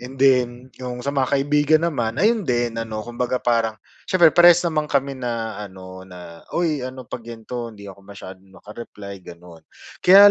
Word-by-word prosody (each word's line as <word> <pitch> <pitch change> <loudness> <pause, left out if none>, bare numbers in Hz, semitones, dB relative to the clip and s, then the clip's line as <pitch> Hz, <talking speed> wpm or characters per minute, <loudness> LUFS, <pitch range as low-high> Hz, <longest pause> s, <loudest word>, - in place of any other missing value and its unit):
And 125 +2 -9
then, 125 -1 +2
yung 125 -1 -6
sa 140 - -1
mga 135 0 +1
kaibigan 150 +3 +3
naman, 120 -9 -1
ayun 220 +1 +3
din 120 -2 0
ano, 110 -1 -4
kumbaga 125 +1 -2
parang 115 -2 +1 0.3
siyempre 175 -3 +5
parehas 175 0 +7
naman 155 -2 0
kami 140 -1 0
na 115 -4 -4
ano 95 -2 -10
na, 90 -2 -12
"Uy 165 -4 +1
ano 130 0 -7
'pag 120 - -6
ganto 115 +1 -6
hindi 100 -1 -12
ako 95 +1 -15
masyadong 95 -1 -12
maka-reply." 105 -2 -10
gano'n. 85 -1 -13 0.4
Kaya 200 +3 +9
120 Hz, 170 wpm, -22 LUFS, 105-140 Hz, 0.4 s, Kaya